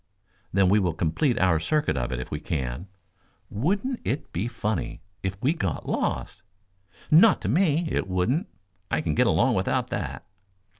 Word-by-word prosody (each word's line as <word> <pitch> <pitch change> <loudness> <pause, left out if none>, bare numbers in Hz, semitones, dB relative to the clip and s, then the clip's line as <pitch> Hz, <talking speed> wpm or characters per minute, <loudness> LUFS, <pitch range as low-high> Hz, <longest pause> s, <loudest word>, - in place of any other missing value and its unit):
"Then 95 0 +3
we 100 +3 +4
will 90 -4 0
complete 90 - +1
our 90 -4 +3
circuit 150 - 0
of 65 -1 -2
it 65 - -2
if 65 - -7
we 75 - -2
can. 70 +2 -3 0.6
Wouldn't 200 - -1
it 140 - -3
be 95 +7 -1
funny 110 -8 -3 0.2
if 95 +1 -3
we 140 +5 +3
got 95 - -3
lost?" - - -2 0.7
"Not 180 +7 +7
to - - -3
me, 170 -2 +2
it 95 - -1
wouldn't. 95 - 0 0.4
I 80 - 0
can 80 -1 -1
get - - +3
along - - +3
without - - 0
that." 85 - -4
95 Hz, 165 wpm, -26 LUFS, -, 0.7 s, Not